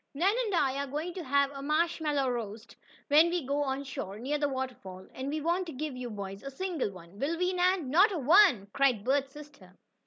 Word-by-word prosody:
"Nan 365 Hz, +8 st, +3 dB
and 410 Hz, -4 st, -1 dB
I 270 Hz, -4 st, +1 dB
are 280 Hz, -, -2 dB
going 305 Hz, +6 st, -4 dB
to 360 Hz, -, -6 dB
have 280 Hz, 0 st, +2 dB
a 275 Hz, -1 st, -8 dB
marshmallow 300 Hz, -2 st, 0 dB
roast, 225 Hz, -2 st, -6 dB, 0.3 s
when 310 Hz, +4 st, +6 dB
we 345 Hz, -4 st, -2 dB
go 285 Hz, +2 st, 0 dB
on 275 Hz, -1 st, -2 dB
shore 205 Hz, -7 st, -6 dB
near 280 Hz, +6 st, -2 dB
the 290 Hz, -1 st, +1 dB
waterfall, 250 Hz, -9 st, -6 dB
and 260 Hz, +1 st, -5 dB
we 305 Hz, +1 st, -2 dB
won't 340 Hz, -2 st, -1 dB
give 300 Hz, -2 st, -4 dB
you 250 Hz, -1 st, -5 dB
boys 200 Hz, -2 st, -7 dB
a 275 Hz, -, -6 dB
single 325 Hz, -, -3 dB
one, 185 Hz, 0 st, -13 dB
will 310 Hz, +6 st, -1 dB
we, 360 Hz, +1 st, 0 dB
Nan?" 360 Hz, -6 st, +1 dB
"Not 380 Hz, +8 st, +5 dB
a 370 Hz, -, -2 dB
one!" 300 Hz, -, +5 dB
cried 260 Hz, -7 st, +2 dB
Bert's 270 Hz, +2 st, 0 dB
sister. 285 Hz, -12 st, -14 dB
280 Hz, 215 wpm, -30 LUFS, 250-325 Hz, 0.3 s, when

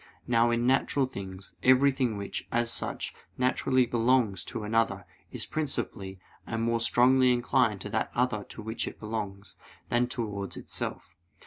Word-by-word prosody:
Now, 120 Hz, -1 st, +3 dB
in 120 Hz, 0 st, +1 dB
natural 135 Hz, +1 st, +2 dB
things, 95 Hz, -5 st, -8 dB
everything 130 Hz, -3 st, +4 dB
which, 100 Hz, 0 st, -5 dB
as 120 Hz, 0 st, +2 dB
such, -, -, -2 dB, 0.2 s
naturally 130 Hz, 0 st, +2 dB
belongs 115 Hz, -4 st, +2 dB
to 110 Hz, -, -5 dB
another, 115 Hz, +2 st, 0 dB, 0.3 s
is -, -, -4 dB
principally, 100 Hz, -10 st, -3 dB, 0.3 s
and 115 Hz, 0 st, -2 dB
more 115 Hz, 0 st, +1 dB
strongly 125 Hz, +2 st, +4 dB
inclined 120 Hz, -1 st, +2 dB
to -, -, -4 dB
that -, -, 0 dB
other 120 Hz, -4 st, +1 dB
to 110 Hz, -, -9 dB
which 110 Hz, +1 st, -2 dB
it -, -, -7 dB
belongs, 105 Hz, -3 st, -5 dB, 0.3 s
than 120 Hz, +1 st, +2 dB
towards 105 Hz, -6 st, -4 dB
itself. -, -, -4 dB
115 Hz, 145 wpm, -29 LUFS, 105-125 Hz, 0.3 s, everything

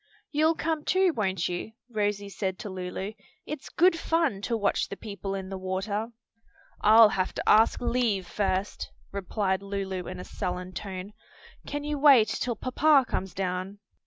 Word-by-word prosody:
"You'll 315 Hz, +2 st, +3 dB
come 315 Hz, -2 st, -1 dB
too, 370 Hz, 0 st, +3 dB
won't 190 Hz, -, 0 dB
you?" 180 Hz, +5 st, -4 dB
Rosie 205 Hz, -3 st, -1 dB
said 190 Hz, -1 st, -3 dB
to 205 Hz, -, -6 dB
Lulu; 185 Hz, +2 st, -5 dB, 0.3 s
"it's 300 Hz, -2 st, -6 dB
good 360 Hz, +1 st, +4 dB
fun 325 Hz, -14 st, +1 dB
to 230 Hz, +2 st, -1 dB
watch 205 Hz, -2 st, 0 dB
the 200 Hz, -, -6 dB
people 200 Hz, -2 st, -5 dB
in 190 Hz, -1 st, -5 dB
the 190 Hz, -1 st, -5 dB
water." 195 Hz, +4 st, -2 dB, 0.7 s
"I'll 220 Hz, +1 st, +8 dB
have 190 Hz, -2 st, -1 dB
to -, -, -4 dB
ask 220 Hz, +1 st, +5 dB
leave 235 Hz, -6 st, 0 dB
first," 195 Hz, 0 st, -2 dB, 0.2 s
replied 195 Hz, 0 st, -1 dB
Lulu 195 Hz, -2 st, -4 dB
in 185 Hz, 0 st, -6 dB
a -, -, -6 dB
sullen 180 Hz, 0 st, -4 dB
tone. 190 Hz, +1 st, -6 dB, 0.5 s
"Can 290 Hz, 0 st, -3 dB
you 295 Hz, -1 st, -2 dB
wait 270 Hz, -7 st, +7 dB
till 240 Hz, +1 st, -2 dB
papa 270 Hz, +4 st, +3 dB
comes 190 Hz, -1 st, -3 dB
down?" 185 Hz, +1 st, -3 dB
200 Hz, 160 wpm, -27 LUFS, 190-245 Hz, 0.7 s, I'll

